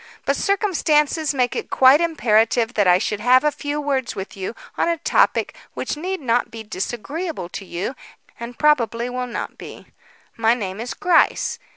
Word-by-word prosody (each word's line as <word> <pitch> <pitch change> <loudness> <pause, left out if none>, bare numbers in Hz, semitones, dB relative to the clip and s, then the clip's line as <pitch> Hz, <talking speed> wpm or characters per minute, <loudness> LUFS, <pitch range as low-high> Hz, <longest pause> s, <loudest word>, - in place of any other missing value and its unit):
"But - - +1
circumstances 320 -6 +1
make 250 -4 0
it - - -4
quite 265 +4 +6
imperative 235 -7 +2
that 205 -5 +2
I 180 0 +6
should 205 +1 -2
have 250 +4 +4
a 300 - +2
few 290 +1 -4
words 275 -4 -2
with 190 0 -7
you 195 +4 -5 0.2
on - - +1
a 335 - 0
topic 330 - +1 0.2
which - - -3
need 370 +5 -4
not 240 -2 +1
be 225 -1 -8
disagreeable 240 - -5
to 195 - -7
you, 180 +7 -4 0.5
and 235 +1 -8
probably 245 -5 +2
will 250 0 -3
not 235 - -6
be. - - -11 0.5
My 225 +1 +3
name 195 -4 -5
is 235 +1 -5
Gryce. 355 -2 +2
250 Hz, 175 wpm, -21 LUFS, 225-300 Hz, 0.5 s, quite